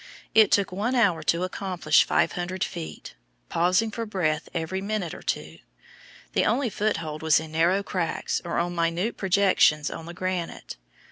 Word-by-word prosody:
It 220 -2 +6
took 200 -2 +2
one 215 +7 -1
hour 200 -9 +3
to 170 +2 +1
accomplish 185 -4 +2
500 180 +1 0
feet, 80 -1 -6 0.4
pausing 185 +6 +2
for 230 +1 -4
breath 160 -6 -1
every 175 +3 -3
minute 200 -4 -3
or - - -9
two. 80 +2 -4 0.7
The - - +2
only 240 +1 +1
foothold 165 -8 -2
was 160 -2 +4
in 160 0 -8
narrow 170 +5 +2
cracks 180 -4 -2
or 170 - -3
on 175 +1 0
minute 170 +6 0
projections 185 -6 +3
on 165 - -7
the 170 - -8
granite. 185 -2 -4
180 Hz, 155 wpm, -26 LUFS, 165-200 Hz, 0.7 s, It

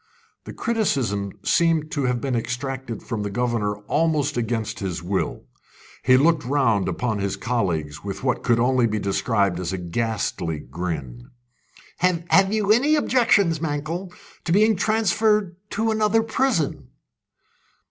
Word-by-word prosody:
The - - -8
criticism 130 - -1
seemed 165 -2 +2
to 140 -2 -1
have 125 -1 0
been 130 0 -2
extracted 125 0 -4
from 115 -3 -4
the 105 - -3
governor 115 -2 -1
almost 150 -3 +1
against 115 -2 -2
his 90 -4 -4
will. 95 +2 -2 0.6
He 130 0 +5
looked 155 +2 +3
round 120 -7 +1
upon 110 +3 -2
his 100 0 -1
colleagues 95 -9 -2
with 100 +4 -6
what 125 -2 0
could 120 -1 +2
only 125 0 +3
be 110 -1 -2
described 100 -2 0
as 90 -1 -3
a 95 - -2
ghastly 90 -3 -2
grin. 70 -6 -6 0.7
"Have 180 +2 +3
you 210 -1 +1
any 275 +8 +4
objection, 230 - +3
Mankell, 160 +4 -3 0.3
to 165 - -3
being 215 +4 +4
transferred 210 -2 +1
to 225 +1 0
another 220 +1 +2
prison?" 225 - 0
125 Hz, 135 wpm, -23 LUFS, -, 0.7 s, He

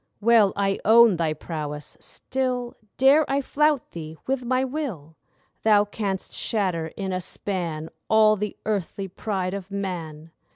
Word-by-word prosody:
Well, 220 -2 +5
I 195 -1 0
own 225 -3 +6
thy 160 -2 0
prowess; 150 -2 -6
still 255 -2 -3 0.2
Dare 275 +4 +6
I 275 +1 +2
flout 295 0 +1
thee 160 -1 -8
with 265 -1 -1
my 255 +2 +1
will 240 - -5 0.5
Thou 210 -2 +5
canst 200 -2 -4
shatter 185 -7 -1
in 190 -2 -3
a 185 - -1
span 170 -4 -4 0.2
All 215 -1 +6
the 210 0 -4
earthly 200 -2 -2
pride 190 -1 -3
of 195 -1 -6
man. 165 -6 -5
200 Hz, 140 wpm, -24 LUFS, 175-235 Hz, 0.5 s, own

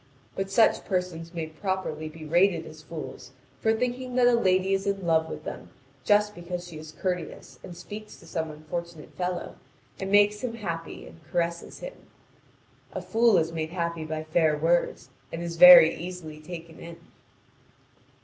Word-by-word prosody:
But 195 0 -3
such 220 +3 +4
persons 180 -3 -3
may 165 -2 -4
properly 155 -1 -3
be 155 0 -11
rated 170 +1 +3
as 155 -1 -11
fools 155 -5 -8 0.3
for 220 - +2
thinking 250 +2 -2
that 250 -1 +4
a 245 - +5
lady 190 -4 +2
is 195 +1 -1
in 195 -2 -1
love 160 -1 +2
with 155 - -7
them - - -7 0.3
just 210 +3 +3
because 175 -1 -6
she 160 -3 -9
is 155 0 -10
courteous 180 +1 -5
and 175 - -9
speaks 210 +4 -9
to - - -17
some 160 -1 -3
unfortunate 155 +1 -7
fellow, 180 0 -4 0.4
and 190 -1 -3
makes 205 +1 +4
him 235 -2 -3
happy 170 -7 -5
and 165 - -15
caresses 170 0 -3
him. - - -6 1.0
A - - -4
fool 230 -2 +4
is 160 +1 +1
made 160 -1 -3
happy 170 -2 -3
by 155 0 -4
fair 155 -1 +2
words, 170 +3 +1 0.2
and 165 +1 -5
is 170 -1 -5
very 265 -12 +10
easily 170 -3 -7
taken 165 +1 -9
in. 170 0 -9
170 Hz, 170 wpm, -27 LUFS, 160-195 Hz, 1.0 s, very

